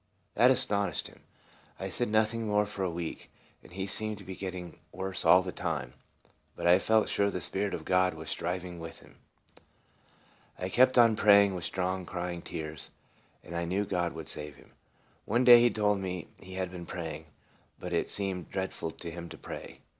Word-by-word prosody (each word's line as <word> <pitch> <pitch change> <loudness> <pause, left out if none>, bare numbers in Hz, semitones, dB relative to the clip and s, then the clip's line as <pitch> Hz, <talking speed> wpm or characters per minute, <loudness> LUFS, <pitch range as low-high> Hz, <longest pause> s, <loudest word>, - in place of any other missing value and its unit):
That 125 - +5
astonished 100 - +2
him. - - -19 0.6
I - - -4
said 120 - -1
noth 110 +1 +3
ing 115 -1 -3
more 105 0 +2
for 100 -1 -6
a 95 - 0
week, 85 -1 -5 0.3
and - - -17
he 95 +2 -4
seemed 105 +1 -2
to 100 - -11
be 95 0 -7
getting 90 -2 -6
worse 95 +1 -2
all 90 +1 +7
the 90 - -4
time; 65 -6 -3 0.6
but - - -5
I 90 +2 +6
felt 110 +2 +3
sure 100 0 +2
the 90 - -3
Spirit 100 +3 -2
of - - -8
God 90 -1 +2
was 80 0 -9
striving 90 +1 -3
with 80 0 -9
him. - - -19 1.4
I 90 - -3
kept 130 +5 +4
on 115 -2 +7
praying 100 -2 +6
with 90 -2 -4
strong 95 0 -2
crying 90 0 -4
and 85 - -11
tears, 75 -2 -6 0.5
and 85 - -8
I 85 0 -1
knew 95 +4 0
God 90 -3 -1
would 80 -2 -8
save 75 -1 -5
him. - - -19 0.5
One 120 +4 +2
day 120 -1 +10
he 120 - +5
told 105 -3 +1
me 90 0 -5
he 95 -1 -10
had 95 -1 -3
been 85 -2 -8
praying, 80 -3 -6 0.5
but 90 -1 -6
it 85 - 0
seemed 95 -4 0
dreadful 95 -3 -3
to 85 +1 -8
him 85 0 -8
to - - -10
pray. - - -9
95 Hz, 200 wpm, -30 LUFS, 85-105 Hz, 1.4 s, day